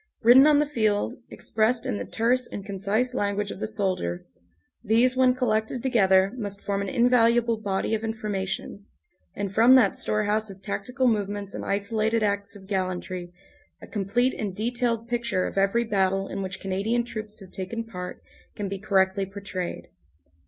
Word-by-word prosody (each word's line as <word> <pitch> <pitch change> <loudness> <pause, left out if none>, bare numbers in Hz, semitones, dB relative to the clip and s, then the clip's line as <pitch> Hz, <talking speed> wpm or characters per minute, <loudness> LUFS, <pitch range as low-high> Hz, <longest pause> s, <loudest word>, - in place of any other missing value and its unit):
Written 255 +5 +8
on 300 -1 +5
the 295 - +3
field, 215 -8 0 0.2
expressed 225 +3 0
in 245 -6 -2
the - - -4
terse 240 +2 +1
and 200 - -7
concise 210 +5 0
language 205 -3 -1
of - - -8
the 215 - -2
soldier, 185 - -1 0.6
these 235 +4 +3
when 255 -1 +4
collected 225 -1 -1
together 195 -6 +4
must 200 -3 -5
form 200 -1 -1
an 200 - -3
invaluable 235 -2 +3
body 200 +1 -1
of 220 0 -1
information, 205 -3 -4 0.5
and 200 -1 -3
from 235 +5 +7
that 230 -7 +4
storehouse 215 0 0
of 195 0 -12
tactical 250 +6 -1
movements 205 -2 -1
and - - -5
isolated 220 +2 0
acts 200 -1 -1
of 195 -1 -12
gallantry 185 -2 -3 0.5
a - - -11
complete 225 +5 0
and 200 -4 -4
detailed 230 +1 -1
picture 235 -6 -1
of - - -5
every 195 +4 +2
battle 195 -3 0
in - - -4
which 185 -1 -5
Canadian 200 +5 -1
troops 215 -3 -5
have 195 -3 -12
taken 210 +5 -4
part 180 -5 -8 0.3
can 205 - -3
be 195 0 -5
correctly 195 -1 +1
portrayed. 195 -2 -6
210 Hz, 165 wpm, -26 LUFS, 195-235 Hz, 0.6 s, Written